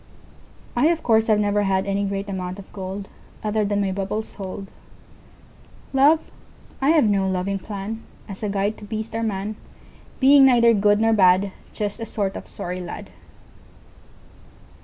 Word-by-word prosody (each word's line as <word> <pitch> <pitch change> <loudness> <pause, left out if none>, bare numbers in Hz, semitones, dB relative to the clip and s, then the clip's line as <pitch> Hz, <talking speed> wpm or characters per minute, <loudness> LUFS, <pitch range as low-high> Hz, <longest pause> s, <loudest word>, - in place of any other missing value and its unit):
I, 300 - +4
of 330 0 +1
course, 225 -1 +3
have 215 -2 +4
never 205 0 +1
hadAny 195 +1 0
great 200 0 -3
amount 185 -1 -4
of 200 - -10
goldOther 200 +2 -5
than 205 0 +1
my 195 -1 0
bubbles 200 +3 -3
hold. 195 0 -6 1.3
Love? 290 +4 +4 0.5
I 275 - +3
have 315 -2 +5
no 200 -3 +2
loving 190 +1 -1
planAs 205 0 -8
a 210 - -1
guide 200 +2 -1
to - - -12
beast 220 +1 -5
or 225 - -2
man, 210 -1 -3 0.6
Being 275 +1 +7
neither 235 -2 +5
good 205 0 +3
nor 225 0 +3
bad, 190 -1 +4 0.2
Just 205 0 -4
a 225 - -5
sort 200 -3 -2
of - - -7
sorry 180 +1 -5
lad. 170 - -8
205 Hz, 150 wpm, -23 LUFS, 195-220 Hz, 1.3 s, Being